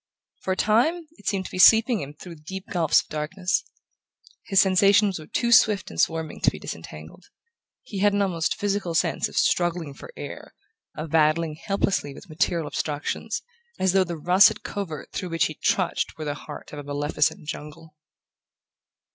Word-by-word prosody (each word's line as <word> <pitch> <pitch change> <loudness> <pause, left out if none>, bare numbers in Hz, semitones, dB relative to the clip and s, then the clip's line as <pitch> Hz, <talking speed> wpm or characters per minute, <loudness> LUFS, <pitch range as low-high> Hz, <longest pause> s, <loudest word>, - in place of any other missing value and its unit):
For 190 - -1
a - - -6
time 310 +11 +2
it - - -13
seemed 195 -2 0
to - - -8
be 185 - -5
sweeping 225 +5 +6
him 145 +1 -8
through 170 +1 -11
deep 190 +4 -7
gulfs 170 -5 +3
of - - -28
darkness. 180 - -1 0.8
His 195 -2 +4
sensations 195 0 +4
were 155 - -11
too 235 -1 -1
swift 210 -5 +4
and 80 - 0
swarming 160 -1 -1
to - - +5
be - - -9
disentangled. 80 - -9 0.6
He 205 -6 -6
had 205 +1 +4
an 200 0 +2
almost 165 -6 -1
physical 200 -4 -2
sense 165 0 +1
of - - -13
struggling 175 -4 +1
for - - -12
air, - - -8 0.4
of 155 0 -5
battling 160 0 +2
helplessly 175 -4 -1
with 195 - -13
material 165 +1 0
obstructions, 150 0 -3 0.3
as 190 -1 +1
though 195 -1 +4
the 170 -2 -5
russet 180 +5 +4
covert 175 -7 -6
through 180 - -4
which 165 -3 +1
he 155 - -3
trudged 180 +3 -1
were 155 - -5
the 145 - -2
heart 145 - -10
of 150 - -6
a - - -7
maleficent 145 +1 -1
jungle... 155 +1 -8
175 Hz, 175 wpm, -25 LUFS, 155-195 Hz, 0.8 s, sweeping